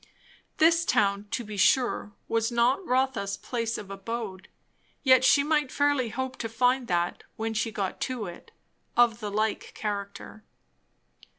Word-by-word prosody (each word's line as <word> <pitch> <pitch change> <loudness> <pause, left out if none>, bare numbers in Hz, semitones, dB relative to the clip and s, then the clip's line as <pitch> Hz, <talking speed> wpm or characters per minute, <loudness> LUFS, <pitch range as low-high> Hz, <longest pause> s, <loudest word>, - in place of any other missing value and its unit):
This 330 +1 +5
town, 200 -7 +1
to 240 - -2
be 210 -1 -7
sure, 235 0 +2 0.2
was 225 +1 0
not 240 +8 +2
Rotha's 250 -6 0
place 230 -2 -3
of 200 -1 -8
abode; 195 -1 -5 0.6
yet 260 -2 +6
she 280 +2 +5
might 300 -2 +1
fairly 285 -4 +1
hope 260 +3 -4
to 225 - -4
find 245 +2 +1
that, 175 -1 -1
when 225 0 -3
she 220 +1 -1
got 195 -3 -3
to 245 -4 -3
it, 175 -2 -10 0.5
of 235 -1 +4
the 210 -2 -4
like 215 +1 -2
character. 205 0 -5
230 Hz, 150 wpm, -27 LUFS, 205-255 Hz, 0.6 s, yet